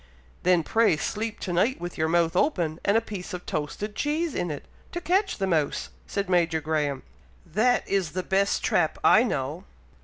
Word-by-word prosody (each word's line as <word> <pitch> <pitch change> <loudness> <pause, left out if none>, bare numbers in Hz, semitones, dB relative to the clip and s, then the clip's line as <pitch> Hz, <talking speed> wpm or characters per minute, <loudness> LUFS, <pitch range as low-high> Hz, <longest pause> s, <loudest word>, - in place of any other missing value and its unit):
"Then 180 -2 +3
pray 225 -3 +3
sleep 220 +7 -3
to 180 - -3
night 215 +10 +2
with 175 0 -6
your 160 - 0
mouth 170 0 +2
open, 175 - +1
and 200 +2 +3
a - - +3
piece 195 -5 -6
of 180 - -8
toasted 180 +8 -4
cheese 305 +1 -1
in 175 - -2
it, 145 -2 -6 0.3
to 345 - -2
catch 380 +4 +1
the 195 - 0
mouse," 160 -6 0 0.2
said 200 0 -2
Major 170 -3 +2
Graham. 150 -3 -1 0.4
"That 220 +9 +2
is 190 -5 0
the 185 0 -2
best 195 +1 +1
trap 160 -3 +2
I 220 - +7
know!" 155 - -2
180 Hz, 185 wpm, -26 LUFS, 160-215 Hz, 0.4 s, I